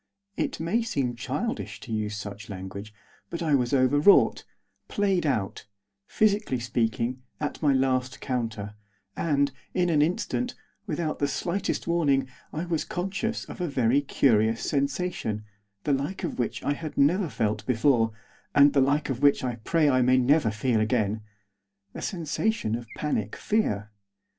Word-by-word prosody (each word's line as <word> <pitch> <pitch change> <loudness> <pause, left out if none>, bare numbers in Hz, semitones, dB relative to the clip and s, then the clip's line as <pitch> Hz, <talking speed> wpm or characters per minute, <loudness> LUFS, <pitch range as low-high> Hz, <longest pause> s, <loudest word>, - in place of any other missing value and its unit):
It - - -2
may 170 +9 +1
seem 135 - -1
childish 145 - -3
to 115 - -6
use 105 0 -2
such 100 0 -7
language; 100 +2 -7 0.4
but 170 0 -4
I 155 -3 +1
was 125 -3 +2
overwrought, 145 +7 +5 0.4
played 195 -5 +1
out; 100 -6 -2 0.4
physically 210 - +1
speaking, 120 +1 -1 0.2
at 150 - -3
my 150 -3 +4
last 130 -1 +1
counter; 115 -5 -3 0.4
and, 140 -3 +1 0.2
in 175 -1 +2
an 150 -2 +4
instant, 225 +9 0 0.3
without 155 -2 -2
the 145 - +2
slightest 180 +6 -2
warning, 145 -6 +2 0.2
I 160 +3 -3
was 165 -3 -1
conscious 195 +6 -3
of - - -8
a 175 - 0
very 130 -1 +2
curious 115 -5 +2
sensation, 140 - -1 0.4
the 145 - +1
like 140 +8 -2
of - - -3
which 120 - -2
I 145 - +1
had 155 +1 -7
never 170 +6 +3
felt 105 -3 -1
before, 115 -2 +3 0.4
and 145 0 +7
the 140 - +4
like 140 +2 +1
of 130 0 -4
which 145 -2 +4
I 125 -2 -2
pray 155 +8 +1
that 145 - +4
I 130 - +4
never 130 +3 +4
may 105 - -5
feel 115 +1 +1
again, 110 -1 +1 0.7
a - - -7
sensation 170 - -1
of 120 0 -3
panic 110 -9 -2
fear. 110 - 0
140 Hz, 155 wpm, -27 LUFS, 115-165 Hz, 0.7 s, and